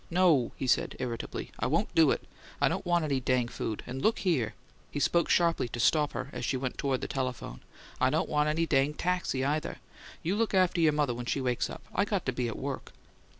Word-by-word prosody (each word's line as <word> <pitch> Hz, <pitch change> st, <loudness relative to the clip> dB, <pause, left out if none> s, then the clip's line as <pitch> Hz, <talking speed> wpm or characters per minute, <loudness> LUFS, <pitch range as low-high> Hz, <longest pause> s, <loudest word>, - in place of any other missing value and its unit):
"No," 170 Hz, -8 st, +4 dB
he -, -, -4 dB
said, 125 Hz, -, +2 dB
irritably. 120 Hz, -3 st, -4 dB
"I -, -, +1 dB
won't -, -, 0 dB
do -, -, +6 dB
it! -, -, 0 dB, 0.4 s
I -, -, +4 dB
don't -, -, -2 dB
want 175 Hz, -2 st, +2 dB
any 140 Hz, -3 st, +1 dB
dang 125 Hz, -1 st, +1 dB
food! 110 Hz, -2 st, -4 dB
And 130 Hz, +2 st, -5 dB
look 220 Hz, -, +3 dB
here" 155 Hz, -, 0 dB, 0.3 s
he -, -, -4 dB
spoke 170 Hz, +4 st, +2 dB
sharply 170 Hz, -7 st, +3 dB
to 120 Hz, -, -6 dB
stop 150 Hz, +4 st, +3 dB
her, 140 Hz, -, -4 dB
as 125 Hz, -, -5 dB
she 130 Hz, -, 0 dB
went 130 Hz, -1 st, -4 dB
toward 135 Hz, -2 st, 0 dB
the -, -, -3 dB
telephone 125 Hz, -, -4 dB, 0.4 s
"I -, -, +4 dB
don't -, -, +1 dB
want 150 Hz, 0 st, +2 dB
any 165 Hz, +2 st, +1 dB
dang 145 Hz, -1 st, +2 dB
taxi, 175 Hz, -7 st, 0 dB
either! 150 Hz, +2 st, -1 dB, 0.5 s
You 180 Hz, +5 st, 0 dB
look 225 Hz, -3 st, +1 dB
after 185 Hz, -2 st, +3 dB
your 160 Hz, -2 st, +5 dB
mother 145 Hz, -4 st, +1 dB
when 120 Hz, 0 st, -6 dB
she 140 Hz, -, 0 dB
wakes 125 Hz, -2 st, 0 dB
up. -, -, -8 dB
I 200 Hz, -, +2 dB
got 200 Hz, -2 st, -1 dB
to 130 Hz, -, +1 dB
be 125 Hz, -1 st, -2 dB
at 115 Hz, -, -4 dB
WORK!" 140 Hz, 0 st, -5 dB
140 Hz, 230 wpm, -30 LUFS, 125-170 Hz, 0.5 s, do